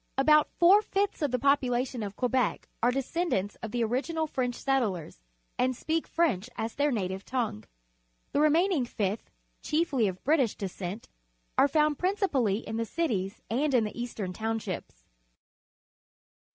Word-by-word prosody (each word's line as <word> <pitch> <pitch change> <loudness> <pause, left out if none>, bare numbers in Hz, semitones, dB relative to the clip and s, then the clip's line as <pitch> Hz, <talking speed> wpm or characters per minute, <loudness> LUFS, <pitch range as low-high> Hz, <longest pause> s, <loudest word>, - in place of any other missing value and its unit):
About 300 +2 +5
four 370 +5 +7
fifths 400 -3 -1
of 295 - +2
the 250 - 0
population 255 -2 +1
of 200 -1 -5
Quebec 250 -2 0
are 240 - +4
descendants 265 - -1
of 225 - -4
the 235 +2 0
original 285 +8 -1
French 255 -5 -2
settlers 215 - -1 0.4
and 255 0 +2
speak 320 +6 -1
French 250 - 0
as 225 +1 -3
their 290 +1 +1
native 190 -4 -2
tongue. 235 - -2 0.7
The 290 - +2
remaining 320 0 +3
fifth, 210 -3 -3 0.3
chiefly 295 -8 +1
of 185 -1 -5
British 275 -6 +2
descent, 190 +1 -5 0.5
are - - +5
found 300 0 +2
principally 285 - +1
in 220 - -3
the 230 - -1
cities 210 - -2
and 275 +4 +1
in 235 - +4
the 210 - -4
Eastern 215 -6 -4
Townships. 220 - -4
250 Hz, 145 wpm, -29 LUFS, 215-300 Hz, 0.7 s, four